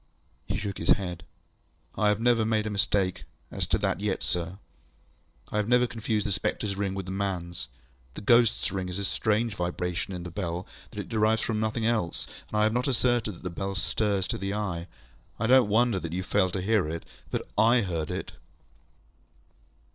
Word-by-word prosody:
ŌĆØ - - +1
He - - 0
shook 100 -1 -3
his - - -2
head. 90 -4 +2 0.7
ŌĆ£I 105 +2 +2
have 105 0 +3
never 120 -1 +4
made 110 -1 +1
a 110 - -2
mistake 100 -2 +1 0.3
as - - -1
to - - +2
that - - 0
yet, 100 -1 -1
sir. 90 +1 -2 0.9
I - - -2
have 105 -1 +1
never 125 +1 +5
confused 110 -3 -1
the 100 - -1
spectreŌĆÖs 100 +1 0
ring 100 -1 -1
with 95 -1 -4
the 95 - -5
manŌĆÖs. 90 -6 -3 0.5
The - - -7
ghostŌĆÖs 115 +1 +4
ring 95 -2 -2
is 90 - -3
a 100 - -2
strange 110 +2 +1
vibration 90 0 -2
in 90 -2 -5
the 85 - -6
bell 90 0 -3 0.2
that 105 - -5
it 95 - -9
derives 110 0 +2
from 110 -2 0
nothing 110 +1 0
else, 110 -8 0 0.2
and 105 - -2
I 105 - +4
have 110 0 +3
not 125 +2 +1
asserted 120 -4 +2
that - - -15
the 90 - -3
bell 95 +3 -3
stirs 100 0 +1
to - - -1
the 95 +1 -2
eye. 90 -5 -2 0.5
I 115 - +1
donŌĆÖt 125 0 +6
wonder 110 -1 +3
that 85 -2 -5
you 95 +1 -1
failed 95 -1 +2
to 95 -3 -1
hear 100 -6 +2
it. 80 +1 -5 0.2
But - - -3
I 120 +2 +5
heard 85 -6 -2
it. - - -4
100 Hz, 200 wpm, -28 LUFS, 90-110 Hz, 0.9 s, donŌĆÖt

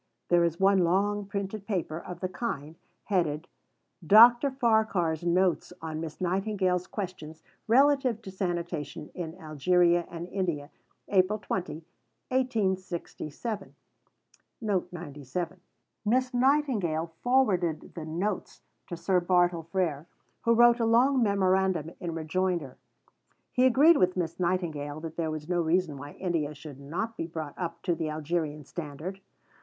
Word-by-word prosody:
There 175 -1 +5
is 170 0 0
one 195 0 +5
long 200 +3 +1
printed 200 0 -4
paper 170 -6 -2
of 175 0 -9
the 185 - 0
kind, 175 - -4 0.3
headed 165 -6 0 0.6
"Dr. 235 - +7
Farquhar's 220 - +1
Notes 180 +1 +1
on 160 -1 -5
Miss 155 -2 -6
Nightingale's 185 -1 0
Questions 175 -6 -6 0.2
relative 265 -1 +4
to 190 - -7
Sanitation 175 -6 -4
in 165 -2 -5
Algeria 170 +3 +2
and 170 0 -6
India, 170 -7 -2 0.4
April 195 +2 +3
20, 180 -5 -4 0.4
1867." 200 - -2 2.3
Miss 250 +4 +1
Nightingale 245 - +1
forwarded 195 -11 +1
the 165 -3 -6
"Notes" 185 +5 -3 0.2
to 175 - -5
Sir 180 +2 +2
Bartle 175 -2 +2
Frere, 165 -5 -1 0.3
who 230 0 +3
wrote 240 +1 +6
a 230 - +2
long 250 +4 +4
memorandum 190 -5 +2
in 170 -2 -4
rejoinder. 165 -3 -1 0.8
He 255 0 +4
agreed 290 +6 +6
with 185 0 +2
Miss 170 -1 -2
Nightingale 160 -5 -1
that 160 0 -7
there 160 -1 -1
was 155 -1 -5
no 175 -1 +1
reason 165 -1 +1
why 145 +1 -9
India 160 -5 -2
should 145 -1 -10
not 175 +11 -4
be 165 - -4
brought 160 -3 -6
up 170 -2 -5
to 175 - +1
the 160 -1 -2
Algerian 155 -1 -2
standard. 165 +6 -7
180 Hz, 130 wpm, -28 LUFS, 160-205 Hz, 2.3 s, Dr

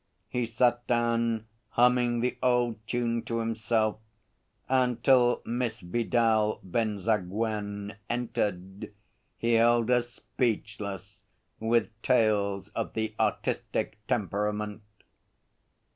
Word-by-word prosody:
He 125 -2 -1
sat 120 +1 +1
down, 115 -2 +1 0.3
humming 120 -1 +4
the 125 +1 0
old 120 -3 +2
tune 120 -1 0
to 115 - -2
himself, 110 -1 0 0.7
and 125 -3 +1
till 125 -2 +4
Miss 120 -1 -2
Vidal 110 +2 +1
Benzaguen 105 0 -1
entered, 100 -6 -3 0.5
he 115 0 +1
held 120 +1 +4
us 120 -1 +2
speechless 105 -5 -3 0.4
with 115 +1 +1
tales 105 -5 +2
of - - -4
the 110 -1 -2
artistic - - -1
temperament. 105 0 -1
115 Hz, 95 wpm, -28 LUFS, 105-120 Hz, 0.7 s, humming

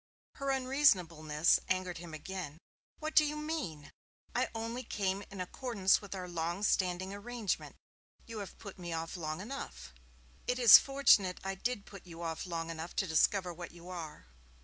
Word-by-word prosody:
Her 275 0 -2
unreasonableness 180 - +3
angered 185 -2 -1
him 170 -1 -9
again. 160 -2 -6 0.4
'What 310 0 -4
do 310 - +8
you 300 0 -1
mean? 300 - -4 0.4
I - - +1
only 230 +2 -3
came 200 -3 -1
in 195 - -9
accordance 195 +1 +1
with 200 -1 -7
our 185 -1 -5
long 175 +2 -2
standing 185 -1 +1
arrangement. 220 0 -3 0.5
You 225 -2 -7
have 200 - -8
put 200 -3 -10
me 175 -1 -5
off 165 +2 -4
long 155 0 -4
enough.' 65 - -7 0.5
'It 250 - +1
is 235 -4 +11
fortunate 255 -9 +4
I 195 0 -2
did 210 +2 -3
put 195 -2 -12
you 170 0 -8
off 165 +2 -3
long 165 -1 -3
enough 165 +1 -6
to - - +1
discover 180 +2 +2
what 170 0 -8
you 175 +1 -12
are.' 165 - -7
185 Hz, 170 wpm, -33 LUFS, 170-225 Hz, 0.5 s, is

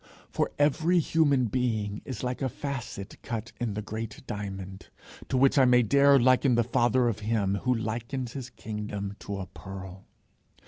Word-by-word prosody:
For - - 0
every 155 +5 +3
human 145 -5 +3
being 110 -3 -1
is 130 -4 -5
like 125 +1 -2
a 135 - +1
facet 125 -7 -6
cut 115 0 -5
in 115 -5 -2
the 105 - -3
great 110 +2 -6
diamond 95 -2 -6 0.4
to 130 - +1
which 135 +2 +5
I 130 - +7
may 125 -1 +5
dare 140 +4 +5
liken 130 0 +4
the 120 - +3
father 120 +1 +2
of 115 - -1
him 105 -3 0
who 125 +5 +1
likens 115 +3 -3
his 130 -3 -6
kingdom 105 -3 -5
to 100 -1 -5
a 95 - -4
pearl. 95 0 -10
120 Hz, 170 wpm, -28 LUFS, 105-130 Hz, 0.4 s, I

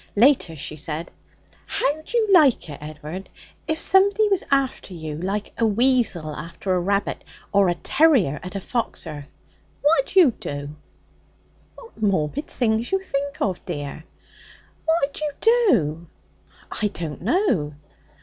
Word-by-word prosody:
Later, 230 - +4
she 155 +1 -6
said: 160 +2 -4 0.6
'How'd 310 +3 -1
you 460 -2 +2
like 295 - +5
it, 145 - -9
Ed'ard, 155 +5 -8 0.4
if 315 0 -1
somebody 400 +4 +4
was 390 -2 +1
after 270 -8 0
you, 160 -2 -6
like 200 +4 -3
a 230 - +3
weasel 220 - +2
after 170 +3 -4
a 180 - +2
rabbit 200 +3 -1 0.3
or 200 -2 +4
a 175 - +1
terrier 265 - +3
at 185 +2 -8
a - - -1
fox 235 +2 -3
earth? 145 -3 -7 0.6
What'd 290 +2 +2
you 350 -9 +7
do?' 145 -7 -6 1.0
'What 465 - -15
morbid 195 - 0
things 225 -1 0
you 385 - +2
think 280 -4 -3
of, 185 -3 -2
dear!' 145 +2 -5 0.8
'What'd 320 -4 +1
you 305 -1 -2
do?' 175 - +3 0.6
'I 210 - 0
don't 165 -7 -6
know.' 210 - +1
210 Hz, 140 wpm, -23 LUFS, -, 1.0 s, you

